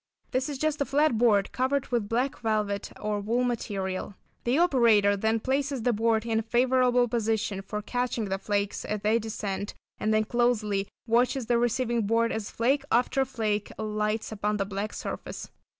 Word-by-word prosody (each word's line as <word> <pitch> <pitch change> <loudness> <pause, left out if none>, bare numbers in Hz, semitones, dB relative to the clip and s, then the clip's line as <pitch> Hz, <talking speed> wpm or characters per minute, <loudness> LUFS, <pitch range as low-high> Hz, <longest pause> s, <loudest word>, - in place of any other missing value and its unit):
This 255 +3 0
is 285 - -4
just 305 +1 -1
a - - +2
flat 285 -5 +2
board 210 -5 +3
covered 260 +2 0
with 230 -5 -1
black 250 +4 0
velvet 210 -3 -1
or 210 -1 -1
wool 230 +5 0
material. 195 -6 -3 0.3
The 245 +4 +2
operator 235 - +4
then 220 +3 +1
places 270 +1 -1
the 245 - +2
board 225 0 +1
in 225 -1 +1
a - - 0
favourable 245 +1 +3
position 220 -3 -1
for 210 +2 -5
catching 245 -1 -1
the 195 -1 -2
flakes 200 0 -1
as 210 -1 -3
they 215 +2 +2
descend, 205 -2 -4 0.2
and 215 - 0
then 215 0 +3
closely 215 -4 +1 0.2
watches 245 +2 +2
the 235 0 +2
receiving 235 -2 0
board 230 +1 +2
as 220 -2 -3
flake 270 +5 +1
after 250 +3 +3
flake 215 -5 -2
alights 215 +1 -2
upon 210 0 -1
the 195 - -1
black 200 +2 -4
surface. - - -6
225 Hz, 175 wpm, -27 LUFS, 210-245 Hz, 0.3 s, operator